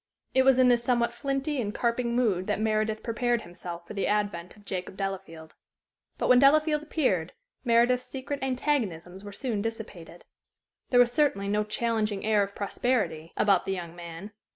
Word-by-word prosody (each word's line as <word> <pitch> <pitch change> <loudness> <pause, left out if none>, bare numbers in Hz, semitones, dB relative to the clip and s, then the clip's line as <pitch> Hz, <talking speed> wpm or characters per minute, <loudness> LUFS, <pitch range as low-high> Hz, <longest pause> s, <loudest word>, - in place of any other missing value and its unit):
It 260 - +5
was 265 -1 +5
in 255 -1 +5
this 240 -1 +4
somewhat 240 -1 +1
flinty 275 +1 -2
and 210 0 -4
carping 235 0 0
mood 205 -7 +1
that - - 0
Meredith 215 0 0
prepared 240 0 0
himself 175 0 -8
for - - -9
the 195 - -1
advent 205 -4 -1
of 205 - -19
Jacob 185 0 -5
Delafield. 185 -5 -5 0.6
But - - -1
when 250 -1 +7
Delafield 300 +2 +4
appeared, 260 - 0 0.3
Meredith's 245 +1 +3
secret 270 +2 -5
antagonisms 220 - -2
were 205 - -8
soon 220 -1 -3
dissipated. 205 -6 -7 0.7
There 245 - +4
was 245 -1 +5
certainly 245 -8 +1
no 210 +1 +1
challenging 215 -1 -1
air 215 -1 +3
of 200 0 -3
prosperity 200 -7 -1
about 200 -3 +3
the 195 - 0
young 170 -2 -6
man. 170 +3 -8
220 Hz, 170 wpm, -28 LUFS, 195-250 Hz, 0.7 s, when